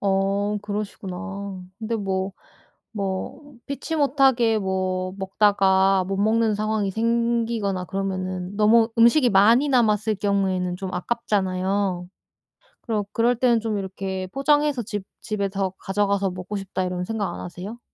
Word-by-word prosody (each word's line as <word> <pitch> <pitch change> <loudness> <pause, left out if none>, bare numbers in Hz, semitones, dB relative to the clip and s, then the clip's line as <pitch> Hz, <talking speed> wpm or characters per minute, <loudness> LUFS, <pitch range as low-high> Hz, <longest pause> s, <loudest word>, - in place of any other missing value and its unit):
어 200 +1 +1
그러시구나. 200 -1 -5 0.2
근데 230 +1 -3
뭐, 190 -1 -2 0.6
뭐 200 +8 -5
피치 280 +3 -4
못하게 265 -6 +3
뭐 185 -2 -1
먹다가 195 -1 +3
못 195 0 -2
먹는 220 +1 +2
상황이 215 -1 -1
생기거나 230 -3 0
그러면은 185 -1 -3
너무 225 +2 +5
음식이 240 +3 +5
많이 230 +8 +5
남았을 215 -4 +2
경우에는 190 -3 0
좀 190 0 -6
아깝잖아요. 190 -3 -1 0.8
그럼 215 -4 -1
그럴 235 +1 +2
때는 240 -2 +3
좀 220 -2 -2
이렇게 190 -1 -4
'포장해서 290 -1 +2
집 205 -2 -5 0.2
집에 200 -2 -2
더 195 -1 -2
가져가서 200 -1 0
먹고 185 +3 -6
싶다.' 195 -1 -3
이런 180 0 -2
생각 205 -3 -2
안 - - -7
하세요? 185 +6 -7
200 Hz, 290 characters per minute, -23 LUFS, 190-225 Hz, 0.8 s, 너무